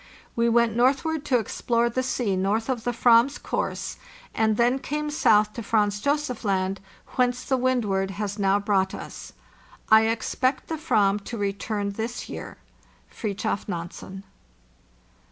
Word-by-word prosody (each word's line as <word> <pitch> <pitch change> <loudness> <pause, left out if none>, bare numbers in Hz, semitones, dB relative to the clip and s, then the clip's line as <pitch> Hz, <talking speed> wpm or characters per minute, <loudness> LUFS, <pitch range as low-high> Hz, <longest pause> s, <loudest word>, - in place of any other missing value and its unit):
We 235 0 +2
went 235 -1 +3
northward 275 +5 +2
to 255 - +3
explore 235 +1 0
the 235 +2 -1
sea 245 -6 -1
north 205 +6 0
of 240 -3 -2
the 245 - +1
/vam's 240 +3 +4
course, - - -3 0.4
and 220 -1 +1
then 245 +3 +3
came 300 +2 -3
south 215 -7 +3
to 235 - -5
Franz 205 -2 +1
Josef 285 -3 -1
Land, 190 -2 0 0.4
whence 250 0 +1
the 265 - +1
Wzzdward 230 -7 0
has 205 +1 -4
now 195 0 +3
brought 200 -2 +1
us. - - -9 0.6
"T 220 0 +7
expect 245 +4 -1
the 325 - -1
/vam 205 -10 +2
to 235 - -5
return 200 0 -2
this 225 +4 -5
year. - - -8 0.3
" - - -31
FRIDTJOF 210 -1 -3
NANSEN." 185 +1 -6
225 Hz, 150 wpm, -25 LUFS, 200-250 Hz, 0.6 s, T